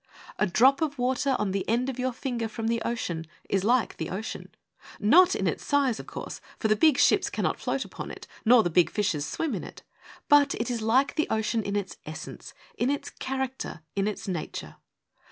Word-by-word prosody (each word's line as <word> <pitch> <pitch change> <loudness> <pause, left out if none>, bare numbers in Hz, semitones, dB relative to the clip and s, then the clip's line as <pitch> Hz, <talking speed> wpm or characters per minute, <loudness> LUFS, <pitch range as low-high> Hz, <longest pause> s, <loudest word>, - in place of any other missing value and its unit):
A 210 - +3
drop 260 - +4
of 295 -3 -1
water 260 +2 +1
on 210 -2 -1
the 195 0 -1
end 240 +3 +1
of 260 -1 -4
your 255 +1 0
finger 240 -2 -3
from 220 +1 -5
the 230 0 0
ocean 170 -9 -3 0.2
is 195 -1 0
like 240 +2 +2
the 160 - -4
ocean: 205 +4 -5 0.5
not 355 - +6
in - - -1
its - - -1
size, 275 -5 +2
of - - -9
course, - - -7 0.2
for 220 - 0
the 215 - +5
big 290 +5 +4
ships - - +4
cannot - - -1
float - - -2
upon - - -7
it, - - -9 0.2
nor 235 0 +6
the 175 - -1
big 175 +1 +4
fishes 180 -9 -1
swim 325 -3 -2
in - - -3
it; - - -11 0.4
but 290 -1 +5
it 230 +2 -2
is 235 -2 -2
like 255 +5 +3
the 310 - 0
ocean 220 +1 0
in 200 -1 -3
its 200 -2 -3
essence, 155 +1 -8 0.2
in 245 - +2
its 285 0 -2
character, 265 -9 -4
in 200 0 +1
its 210 - -4
nature. 175 -5 -5
230 Hz, 210 wpm, -27 LUFS, 205-265 Hz, 0.5 s, not